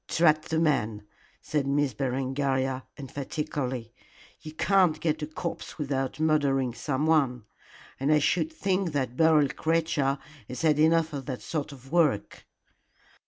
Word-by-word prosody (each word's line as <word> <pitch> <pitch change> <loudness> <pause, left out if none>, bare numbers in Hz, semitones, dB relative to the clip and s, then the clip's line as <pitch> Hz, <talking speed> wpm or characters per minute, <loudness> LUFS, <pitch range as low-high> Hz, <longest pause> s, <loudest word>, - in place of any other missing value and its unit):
"Drat 155 -2 +3
the 160 - -1
man!" 110 -10 +1 0.4
said 145 -3 -1
Miss 140 -1 +1
Berengaria, 130 0 -1
emphatically. 135 -3 -4 0.5
"You 155 - -8
can't 175 -1 +3
get 155 -1 -1
a 150 - -3
corpse 165 +2 -6
without 135 -2 -2
murdering 140 -5 +2
someone, 135 -3 +1 0.5
and 140 +3 +1
I 155 - +6
should 170 - +1
think 190 - -1
that 130 -4 -1
Beryl 155 -2 +4
creature 160 -4 0 0.3
has 125 - -6
had 150 -2 +3
enough 160 0 +3
of 135 -3 -5
that 130 -3 -5
sort 150 -2 -3
of 135 -1 -13
work." 155 -11 +1
145 Hz, 135 wpm, -27 LUFS, 135-160 Hz, 0.5 s, I